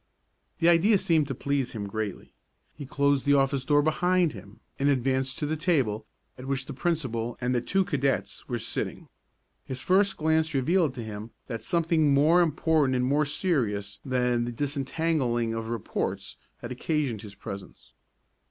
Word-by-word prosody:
The 165 - +2
idea 175 +5 +5
seemed 165 -6 +2
to 135 - -3
please 140 -1 -1
him 105 -3 -4
greatly. 105 -1 -5 0.4
He 145 -3 -9
closed 140 0 +2
the 145 0 +4
office 135 -1 +2
door 145 +1 +3
behind 175 +1 +2
him 105 +2 -12 0.2
and 140 +1 +3
advanced 130 0 +1
to 150 - -2
the 155 +2 -1
table 135 - 0 0.3
at 130 - -8
which 135 -1 -1
the 145 - -7
principal 130 -7 -2
and 125 0 0
the 120 - +1
two 195 +10 +1
cadets 140 -7 -1
were - - -1
sitting. - - -4 0.5
His 130 -1 -6
first 190 +6 +2
glance 160 0 +1
revealed 155 +1 +2
to 120 - -5
him 110 0 -7 0.2
that 115 -3 -5
something 165 -4 +2
more 160 +5 +5
important 155 -4 +2
and 125 0 +1
more 145 +3 +2
serious 110 - -1
than 125 -2 +1
the 120 - -3
disentangling 135 -3 -1
of 115 0 -4
reports 115 -3 -3 0.3
had 120 - -6
occasioned 130 -4 -1
his 105 -3 -10
presence. 100 -1 -9
140 Hz, 165 wpm, -27 LUFS, 120-160 Hz, 0.5 s, idea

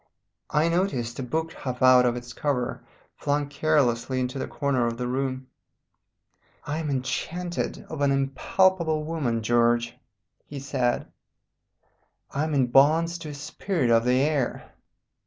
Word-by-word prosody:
I 150 +2 +2
noticed 165 -10 -1
a - - -1
book 160 +6 -2
half 130 -2 -4
out 125 -1 +7
of 120 - 0
its 120 0 -7
cover, 125 -4 -2 0.3
flung 145 0 0
carelessly 140 -4 +1
into 125 +1 -2
the - - -3
corner 135 -5 0
of 115 0 -3
the 125 - -3
room. 130 +1 -2 1.2
"I 150 +2 -2
am 155 -2 -3
enchanted 170 +6 -3
of 155 -2 -6
an 140 - +3
impalpable 155 +4 +1
woman, 140 -8 -2
George," 120 +1 +2 0.5
he 145 - -7
said, 130 -3 -1 1.3
"I 145 +3 -1
am 155 -2 -2
in 130 -3 +2
bonds 165 +6 +4
to 160 -2 -7
a 145 - -7
spirit 145 -1 -2
of 115 0 +5
the 125 +1 +3
air. 145 -4 -1
135 Hz, 145 wpm, -26 LUFS, 125-155 Hz, 1.3 s, out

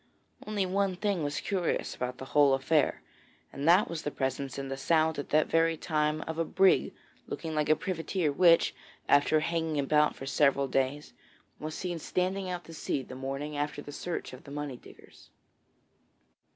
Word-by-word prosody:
Only 205 -2 0
one 190 0 0
thing 200 -2 -1
was 145 0 -2
curious 185 -4 -1
about 125 0 -4
the 130 - -7
whole 145 -2 +6
affair, 140 +2 +1 0.5
and 140 +3 -3
that 180 +5 +6
was 165 -2 -4
the - - -2
presence 135 -1 -3
in 135 0 -4
the 135 - -3
Sound 160 +2 +2
at 145 - -5
that 155 +1 +4
very 165 0 +2
time 155 -1 0
of 160 0 -5
a - - +3
brig 190 +3 +3 0.4
looking 160 -1 -5
like 150 -1 0
a 155 - +6
privateer 170 -2 -1
which, 170 +3 +5 0.3
after 145 +2 +4
hanging 160 -1 -1
about 150 +2 +3
for 135 - -8
several 140 0 +2
days, 135 +3 -1 0.5
was 155 0 -5
seen 175 -2 -4
standing 185 +3 -1
out 180 -1 -4
to 165 - -12
sea 140 -3 -2
the - - -10
morning 135 +3 -4
after 145 0 -3
the 145 - -9
search 170 0 -5
of 130 - -11
the - - -12
money 145 -2 -4
diggers. - - -17
155 Hz, 180 wpm, -29 LUFS, 140-170 Hz, 0.5 s, whole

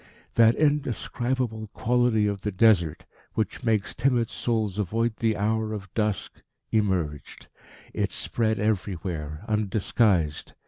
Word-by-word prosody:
That 115 0 +5
indescribable 130 -5 -1
quality 120 -2 +2
of 100 -2 -1
the 105 - -2
Desert, 90 -5 +3 0.3
which 110 +3 -2
makes 110 -4 +1
timid 120 -3 +1
souls 110 -4 -1
avoid 110 +3 0
the 110 -2 +1
hour 110 +1 0
of 95 -3 -7
dusk, 105 -3 -2 0.3
emerged; 90 -9 -1 0.5
it - - -1
spread 110 -2 0
everywhere, 90 -6 -2
undisguised. 105 -5 +1
110 Hz, 110 wpm, -26 LUFS, 95-115 Hz, 0.5 s, That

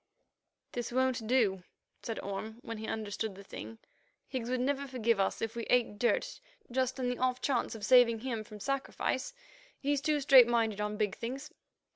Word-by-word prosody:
"This 240 -1 -4
won't 255 -3 +1
do," 215 -7 +2 0.4
said 225 -2 -4
Orme, 210 +3 -5
when 230 -1 -6
he 220 - -5
understood 215 -1 -3
the 200 - -11
thing. 225 +3 -8 0.5
"Higgs 250 -3 -4
would 255 0 0
never 280 +2 0
forgive 230 -4 +1
us 195 - 0
if 225 0 -3
we 235 - -2
ate 230 -4 +2
dirt 250 - +1 0.3
just 260 +1 0
on 255 - 0
the 250 0 -2
off 255 0 +1
chance 250 -4 0
of 210 -2 -5
saving 240 -3 +6
him 235 -4 -3
from 210 0 -11
sacrifice. 275 - -2 0.4
He's 285 0 0
too 300 0 +1
straight 265 -4 +8
minded 225 -3 +1
on 210 0 -2
big 205 -3 0
things. 265 +6 -5
240 Hz, 180 wpm, -32 LUFS, 220-260 Hz, 0.5 s, straight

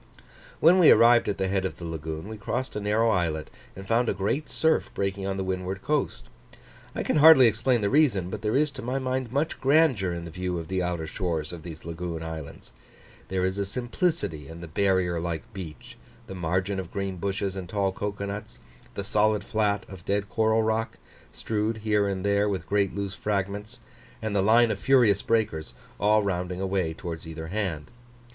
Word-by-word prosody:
When 175 +4 +6
we 170 - +8
arrived 120 -1 +6
at 100 - -2
the 95 - 0
head 95 0 0
of 95 - -3
the 85 - -7
lagoon, 80 +1 -5
we 110 - -6
crossed 120 +5 -3
a - - -1
narrow 110 +2 +2
islet, 80 -5 -1 0.2
and 95 +1 -9
found 115 +2 +2
a - - 0
great 115 +10 -1
surf 160 0 +1
breaking 95 0 -2
on 95 0 -2
the 95 - -1
windward 95 +1 -3
coast. 150 +2 -1 0.7
I - - -2
can - - +1
hardly 150 -3 +9
explain 115 +2 +2
the 100 - +1
reason, 120 - +3
but 105 - -5
there 105 +1 0
is 150 +1 +2
to 130 -1 -8
my 125 +2 -2
mind 130 -2 -2
much 145 +4 -1
grandeur 135 - +3
in 85 0 -5
the 85 - -8
view 90 +1 -3
of 80 -1 -6
the 95 -1 0
outer 90 -2 -2
shores 80 -2 -3
of 85 - -8
these 80 -1 -10
lagoon 85 0 -5
islands. 80 -3 -8 0.5
There 95 -1 0
is 95 +2 -2
a - - +1
simplicity 120 - -2
in 80 +2 -10
the 85 - -7
barrier 90 0 +1
like 85 +5 -5
beach, 90 -6 -9 0.3
the - - -8
margin 95 +2 -1
of 90 -3 -6
green 95 -1 -3
bushes 95 +1 -2
and 95 -2 -6
tall 100 -1 0
cocoa 100 +1 -4
nuts, 105 +2 -6 0.4
the 100 - -3
solid 105 +1 +2
flat 105 -2 0
of 95 -3 -11
dead 100 +1 -1
coral 110 0 +2
rock, 110 +1 -1 0.3
strewed 110 +1 -2
here 105 -2 +2
and 95 -1 -3
there 100 +1 +2
with 95 -2 -3
great 100 -2 0
loose 100 -2 -3
fragments, 105 +4 -3 0.4
and 110 -2 -3
the 100 - +3
line 115 +3 +5
of - - -3
furious 120 -7 +4
breakers, 105 - -1 0.2
all 105 +1 +4
rounding 90 -2 -2
away 95 -3 0
towards 80 0 -7
either 80 0 -7
hand. 90 -7 -3
100 Hz, 200 wpm, -26 LUFS, 90-110 Hz, 0.7 s, hardly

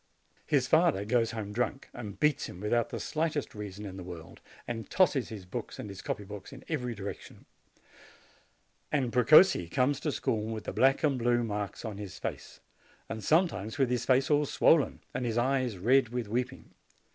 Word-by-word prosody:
His - - +3
father 100 +2 +3
goes 115 0 +2
home 105 -3 -5
drunk, 125 +4 -2
and 105 -5 -8
beats 150 -2 +2
him 90 - -10
without 115 +3 +1
the - - -5
slightest 155 -2 -2
reason 105 -1 -7
in 95 -1 -7
the 95 - -7
world, 85 -3 -10 0.3
and 115 -2 -5
tosses 145 -9 +2
his 105 -4 -8
books 90 - -6
and - - -6
his 100 -1 -8
copy 105 - -3
books 100 -1 -9
in 135 -1 -11
every 125 -7 -2
direction. 100 -1 -8 1.5
And 130 -5 0
Precossi 125 - +6
comes 130 +7 +1
to 150 0 -1
school 110 -5 -1
with 110 -2 -5
the - - -5
black 135 +1 +3
and 140 -4 +2
blue 120 0 +2
marks 105 0 -4
on 105 -2 -5
his 100 -3 -7
face, - - -6 0.5
and 110 -1 -5
some 165 - +4
times 105 - -6
with 135 -3 +2
his 125 -1 0
face 130 +3 +3
all 150 0 +3
swollen, 155 +1 +3
and - - -2
his 115 -1 -1
eyes 130 -3 +1
red 125 +6 +3
with 120 -2 -3
weeping. 125 +4 -3
120 Hz, 190 wpm, -30 LUFS, 105-135 Hz, 1.5 s, Precossi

